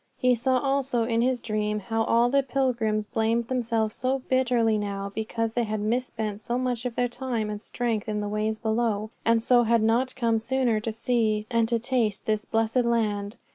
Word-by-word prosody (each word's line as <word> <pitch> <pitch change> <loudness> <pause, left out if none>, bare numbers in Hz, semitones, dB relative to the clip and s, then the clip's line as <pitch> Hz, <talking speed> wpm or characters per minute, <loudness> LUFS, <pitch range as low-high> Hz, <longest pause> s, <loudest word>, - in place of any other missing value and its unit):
He 250 0 +3
saw 255 +2 +1
also 270 -3 +1
in 230 0 +1
his 250 0 +1
dream 210 -2 -1
how 225 +3 -1
all 235 +2 +3
the 275 0 +4
pilgrims 240 -5 0
blamed 225 +1 0
themselves 230 -4 0
so 260 +2 0
bitterly 240 -4 +2
now 200 -1 -4
because 225 +1 -2
they 240 - +1
had 215 0 -2
misspent 220 -2 -2
so 240 +2 -2
much 250 -2 -2
of 245 -2 -3
their 245 - +1
time 240 -4 -3
and 210 0 -5
strength 230 -3 -2
in 210 0 -1
the 205 - -2
ways 215 +1 -1
below, 220 -1 -1
and 230 0 +3
so 245 0 +5
had 230 -1 +2
not 240 +4 +1
come 230 -3 +1
sooner 240 -1 +1
to 225 +1 -3
see 220 -2 0
and 230 -1 +2
to 235 - +2
taste 230 -4 -1
this 215 -1 0
blessed 225 +2 0
land. 215 -3 0
230 Hz, 195 wpm, -26 LUFS, 215-245 Hz, -, so